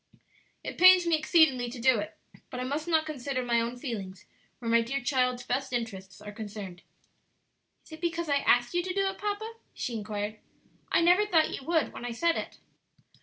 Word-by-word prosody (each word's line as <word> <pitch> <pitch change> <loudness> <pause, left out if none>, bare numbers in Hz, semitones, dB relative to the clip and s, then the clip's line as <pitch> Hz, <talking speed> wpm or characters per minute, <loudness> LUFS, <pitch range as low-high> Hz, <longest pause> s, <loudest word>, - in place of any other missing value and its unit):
"It - - -6
pains 370 0 +8
me 335 -1 +3
exceedingly 305 -6 +3
to 245 +1 -8
do 245 -1 +4
it, 205 +1 -6 0.3
but 250 - -6
I - - -2
must 290 +5 -3
not 320 -2 +2
consider 275 -3 -3
my 235 -1 +2
own 235 +2 -3
feelings 200 -8 -6 0.3
where 230 -2 -3
my 235 0 +5
dear 260 +4 -2
child's 250 -1 0
best 265 +1 -2
interests 200 -6 -5
are 210 - -8
concerned." 205 -4 -8 1.0
"Is - - -19
it 315 0 -10
because 340 -1 -2
I 285 -1 +2
asked 245 -2 +2
you 350 - +2
to 365 +1 -4
do 395 0 +2
it, 385 - -8
papa?" 420 +2 -3 0.2
she 245 - -4
inquired. 210 -1 -4 0.5
"I - - +4
never 360 +5 +4
thought 325 -5 +3
you - - -6
would 330 -2 +1
when - - -8
I 245 -1 -4
said 335 +7 +1
it." - - -5
255 Hz, 200 wpm, -28 LUFS, 230-330 Hz, 1.0 s, pains